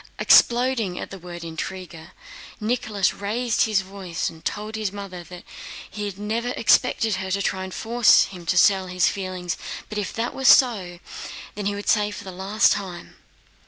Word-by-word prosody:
Exploding 240 Hz, -6 st, +4 dB
at -, -, -7 dB
the 195 Hz, -, -8 dB
word 175 Hz, -1 st, -9 dB
intriguer, 165 Hz, 0 st, -7 dB, 0.5 s
Nicholas, 215 Hz, -3 st, 0 dB
raising 225 Hz, +3 st, 0 dB
his 205 Hz, -3 st, +2 dB
voice, 190 Hz, -4 st, -4 dB
told 215 Hz, +1 st, -4 dB
his 215 Hz, -3 st, -2 dB
mother 195 Hz, -3 st, -7 dB, 0.7 s
he 210 Hz, -1 st, -4 dB
had 200 Hz, -2 st, -5 dB
never 220 Hz, +4 st, -2 dB
expected 220 Hz, -2 st, +3 dB
her 190 Hz, 0 st, -4 dB
to 195 Hz, +1 st, 0 dB
try 190 Hz, -1 st, -1 dB
to -, -, -10 dB
force 230 Hz, +3 st, +4 dB
him 180 Hz, -3 st, -8 dB
to 185 Hz, -, +1 dB
sell 190 Hz, +1 st, +4 dB
his 180 Hz, 0 st, +2 dB
feelings, 185 Hz, -3 st, -4 dB, 0.3 s
but 210 Hz, -, -3 dB
if 200 Hz, -, -3 dB
that 230 Hz, +1 st, -3 dB
were 265 Hz, -, -6 dB
so, 205 Hz, -10 st, +5 dB, 0.6 s
he 205 Hz, 0 st, -2 dB
would 205 Hz, -, -7 dB
say 210 Hz, -1 st, +3 dB
for 205 Hz, -, -8 dB
the 190 Hz, -, -8 dB
last 195 Hz, +4 st, +2 dB
time.... 185 Hz, -4 st, -7 dB
200 Hz, 165 wpm, -23 LUFS, 185-215 Hz, 0.7 s, so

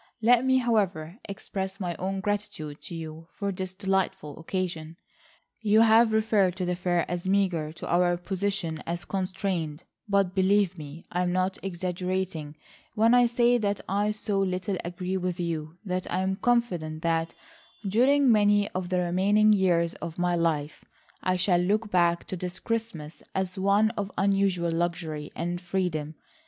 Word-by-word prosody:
Let 240 Hz, +2 st, +5 dB
me, 260 Hz, 0 st, +4 dB
however, 200 Hz, -7 st, 0 dB
express 190 Hz, -1 st, -5 dB
my 175 Hz, -3 st, -2 dB
own 190 Hz, +1 st, -2 dB
gratitude 200 Hz, -8 st, -3 dB
to 170 Hz, -, -7 dB
you 160 Hz, 0 st, -7 dB
for 200 Hz, -1 st, -2 dB
this 185 Hz, -1 st, -4 dB
delightful 190 Hz, -6 st, -2 dB
occasion. 165 Hz, -2 st, -4 dB, 0.6 s
You 215 Hz, 0 st, +4 dB
have 225 Hz, 0 st, +6 dB
referred 215 Hz, -4 st, +2 dB
to 185 Hz, -, -2 dB
the 180 Hz, 0 st, 0 dB
fare 175 Hz, -1 st, 0 dB
as 175 Hz, +1 st, -4 dB
meagre, 185 Hz, -6 st, +1 dB
to -, -, -8 dB
our 175 Hz, 0 st, +3 dB
position 185 Hz, -3 st, -2 dB
as 170 Hz, +1 st, -3 dB
constrained, 180 Hz, -4 st, -2 dB, 0.3 s
but 200 Hz, -2 st, +2 dB
believe 190 Hz, -1 st, +3 dB
me, 155 Hz, 0 st, -10 dB
I 180 Hz, -, 0 dB
am 180 Hz, -1 st, +1 dB
not 185 Hz, +1 st, 0 dB
exaggerating 180 Hz, -3 st, -3 dB, 0.4 s
when 225 Hz, +2 st, +4 dB
I 245 Hz, -1 st, +6 dB
say 240 Hz, +1 st, +3 dB
that 205 Hz, -2 st, 0 dB
I 205 Hz, +2 st, +1 dB
so 210 Hz, -1 st, -1 dB
little 185 Hz, 0 st, -1 dB
agree 180 Hz, +2 st, -3 dB
with 180 Hz, -1 st, -3 dB
you 165 Hz, -1 st, -3 dB
that 185 Hz, -1 st, -3 dB
I 185 Hz, -, 0 dB
am 190 Hz, 0 st, -1 dB
confident 175 Hz, -11 st, 0 dB
that, 165 Hz, 0 st, 0 dB, 0.5 s
during 260 Hz, +6 st, +4 dB
many 205 Hz, -1 st, +3 dB
of 185 Hz, -1 st, -4 dB
the 180 Hz, -1 st, +1 dB
remaining 200 Hz, +5 st, +4 dB
years 175 Hz, -4 st, +2 dB
of 165 Hz, -1 st, -6 dB
my 175 Hz, 0 st, +1 dB
life 160 Hz, -3 st, -1 dB, 0.4 s
I 185 Hz, -, +1 dB
shall 180 Hz, -1 st, +2 dB
look 210 Hz, +4 st, 0 dB
back 170 Hz, -1 st, +2 dB
to -, -, -5 dB
this 180 Hz, 0 st, -5 dB
Christmas 220 Hz, -10 st, -4 dB
as 190 Hz, 0 st, -2 dB
one 200 Hz, +3 st, +3 dB
of 205 Hz, -3 st, -4 dB
unusual 195 Hz, -3 st, +2 dB
luxury 165 Hz, -3 st, -2 dB
and 175 Hz, +1 st, -3 dB
freedom. 175 Hz, -4 st, -2 dB
185 Hz, 160 wpm, -27 LUFS, 170-200 Hz, 0.6 s, have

